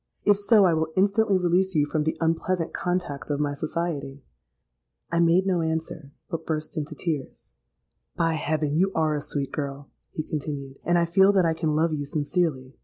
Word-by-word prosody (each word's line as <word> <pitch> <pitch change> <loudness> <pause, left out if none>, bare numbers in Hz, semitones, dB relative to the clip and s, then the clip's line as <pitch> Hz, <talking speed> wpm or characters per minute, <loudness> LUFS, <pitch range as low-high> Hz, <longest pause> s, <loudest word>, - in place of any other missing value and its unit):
If 205 -1 +5
so, 205 -1 +5
I 175 - +4
will 160 0 -1
instantly 200 +1 +3
release 180 +1 +1
you 150 -1 +3
from 150 0 -1
the 160 - -1
unpleasant 165 +1 0
contact 175 -6 -3
of 145 -1 -1
my 145 -1 0
society.'—I 135 - -6
made 170 +2 +4
no 185 -3 +1
answer, 160 -2 -3 0.2
but 165 -2 -4
burst 155 0 -3
into 155 0 -4
tears.—'By 160 - -5
heaven! 155 -1 -1
you 190 +5 +2
are 155 -1 +2
a 150 - -2
sweet 140 -1 -2
girl,' 140 -1 -5 0.2
he 155 - -4
continued; 140 -3 -5
'and 175 0 +2
I 170 - +3
feel 190 +4 +5
that 190 -3 +4
I 165 - +2
can 160 -2 -1
love 160 +1 +2
you 145 -1 -2
sincerely. 145 -3 -1
160 Hz, 180 wpm, -25 LUFS, 145-175 Hz, 0.2 s, If